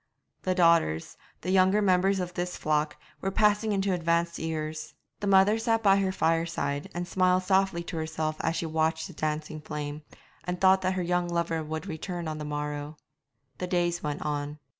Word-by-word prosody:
The 185 -1 0
daughters, 165 - +3 0.3
the 185 - -2
younger 190 +2 +4
members 190 -1 +3
of 180 -1 -3
this 180 0 -3
flock, 150 0 0 0.2
were 195 - 0
passing 210 +2 +2
into 195 -1 +1
advanced 170 0 0
years. 155 -1 -4 0.2
The 205 - -3
mother 200 +3 +5
sat 225 0 +1
by 195 -1 +6
her 195 -1 +1
fireside, 165 -5 0
and 175 0 -3
smiled 185 0 +2
softly 190 -2 +2
to 170 0 -6
herself 155 -1 -2
as 160 - 0
she 165 - -2
watched 160 0 0
the 180 - -9
dancing 155 0 -3
flame, 150 0 -5 0.4
and 180 0 -3
thought 190 0 +5
that 185 0 +1
her 185 - -1
young 175 0 0
lover 170 -2 -1
would 160 +3 -5
return 175 -1 -5
on 155 0 -4
the 150 - -5
morrow. 150 0 -4 0.6
The 180 - -2
days 175 -1 0
went 150 -1 -3
on. 145 0 -3
170 Hz, 185 wpm, -28 LUFS, 155-185 Hz, 0.6 s, by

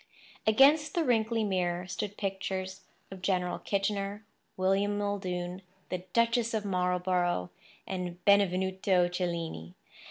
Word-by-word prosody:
Against 280 +7 +5
the 340 - +2
wrinkly 225 -2 +2
mirror 180 -3 0
stood 205 +3 -4
pictures 190 -1 -3 0.3
of 190 -1 -9
General 185 -1 0
Kitchener, 200 +1 -2 0.3
William 195 +2 +2
Muldoon, 185 -3 -3 0.3
the 185 0 -4
Duchess 230 0 +2
of 210 -1 -2
Marlborough, 180 - 0 0.3
and 180 -2 -4
Benvenuto 190 -2 +3
Cellini. 170 - -3
190 Hz, 105 wpm, -30 LUFS, 180-205 Hz, 0.3 s, Against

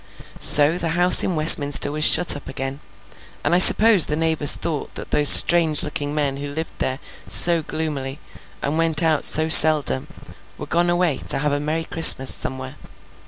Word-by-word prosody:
So, 150 +4 0
the 165 - -6
house 180 +1 +5
in 180 - -6
Westminster 145 -2 +2
was 150 +1 -6
shut 175 - +4
up 145 - -14
again, 135 +1 -9 0.6
and - - -4
I 175 - -1
suppose 210 -2 +5
the 150 - -6
neighbours 160 -2 0
thought 155 -4 -9
that - - -11
those 145 -1 0
strange 165 -3 +4
looking 145 0 -8
men 140 -2 -5
who 145 +1 -10
lived 160 +3 -10
there 130 0 -5 0.3
so 170 -1 0
gloomily, 150 -3 -9 0.4
and 150 +3 -6
went 165 0 -3
out 160 -2 -3
so 155 +1 +2
seldom, 155 - +4 0.5
were - - -11
gone 175 +1 -5
away 175 -5 -4
to - - -3
have 150 +1 -5
a 145 - -5
merry 155 +3 -7
Christmas 160 -5 +3
somewhere. 130 +2 -8
155 Hz, 175 wpm, -16 LUFS, 145-165 Hz, 0.6 s, house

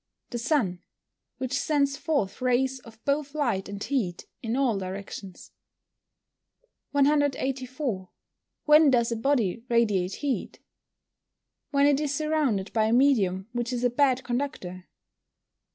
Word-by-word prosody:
_ - - -52
The 240 - -3
sun, 230 - 0 0.6
which 260 0 -4
sends 280 0 +1
forth 275 - -1
rays 255 +1 +1
of 230 -2 -15
both 285 +1 -1
light 235 -11 -1
and 200 0 -5
heat 210 -11 -2 0.2
in 230 0 -2
all 260 -5 +2
directions. 190 0 -7 1.4
184. 270 -6 0 0.6
When 300 0 +7
does 235 -3 +2
a - - 0
body 230 -4 0
radiate 205 -6 +2
heat? 280 -3 -3 1.1
When 280 -1 +3
it 285 -1 +4
is 300 -2 -1
surrounded 295 -10 0
by 220 -1 +3
a 220 - +1
medium 210 -8 +3
which 240 0 -2
is 245 -1 -2
a 245 - +3
bad 260 0 +2
conductor. 240 -9 -4
250 Hz, 130 wpm, -27 LUFS, 210-280 Hz, 1.4 s, When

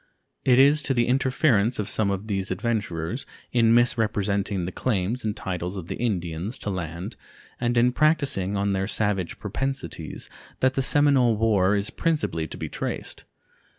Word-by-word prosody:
It 125 -2 +4
is 140 +3 +6
to 135 - 0
the 120 -1 +3
interference 125 -3 +2
of 105 - -2
some 110 -2 +1
of 100 +1 -2
these 100 -2 -2
adventurers, 105 - -2 0.2
in 115 -2 +4
misrepresenting 105 -5 +1
the 90 - -4
claims 110 +2 -1
and 105 -1 -2
titles 90 0 -4
of 85 -3 -7
the - - -3
Indians 95 -2 -2
to 105 - -4
land 85 -1 -5 0.4
and 120 0 0
in 120 +1 +4
practicing 135 - +1
on 100 0 0
their 95 0 -1
savage 100 -5 -1
propensities, 130 - -4 0.3
that 130 0 +3
the 135 - 0
Seminole 135 -4 +4
war 105 -3 +3
is 100 +1 0
principally 150 - -1
to - - -8
be - - -4
traced. - - -5
105 Hz, 160 wpm, -25 LUFS, 95-125 Hz, 0.4 s, is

